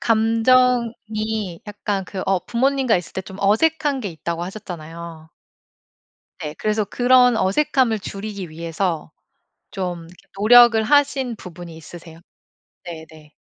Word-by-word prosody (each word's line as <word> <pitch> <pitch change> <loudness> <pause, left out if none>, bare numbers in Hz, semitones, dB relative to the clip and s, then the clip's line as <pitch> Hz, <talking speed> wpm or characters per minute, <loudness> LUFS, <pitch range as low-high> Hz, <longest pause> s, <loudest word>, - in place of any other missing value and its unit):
"감정이 225 -4 +1
약간 205 -1 -3
그 190 0 -6
어 190 -1 +2
부모님과 260 0 +1
있을 175 - -6
때 - - -3
좀 190 0 -11
어색한 285 +7 +2
게 210 - -4
있다."고 170 0 -5
하셨잖아요. 170 -4 -8 1.1
네 150 -1 -5
그래서 215 0 0
그런 250 +2 +4
어색함을 235 +3 +1
줄이기 200 -3 -7
위해서 165 +1 -3 0.6
좀 180 -4 -5 0.3
노력을 235 +2 +7
하신 275 -1 +2
부분이 175 -3 -10
있으세요? 165 +1 -12 0.6
네 165 -3 -8
네. 155 -1 -17
205 Hz, 260 characters per minute, -21 LUFS, 170-240 Hz, 1.1 s, 노력을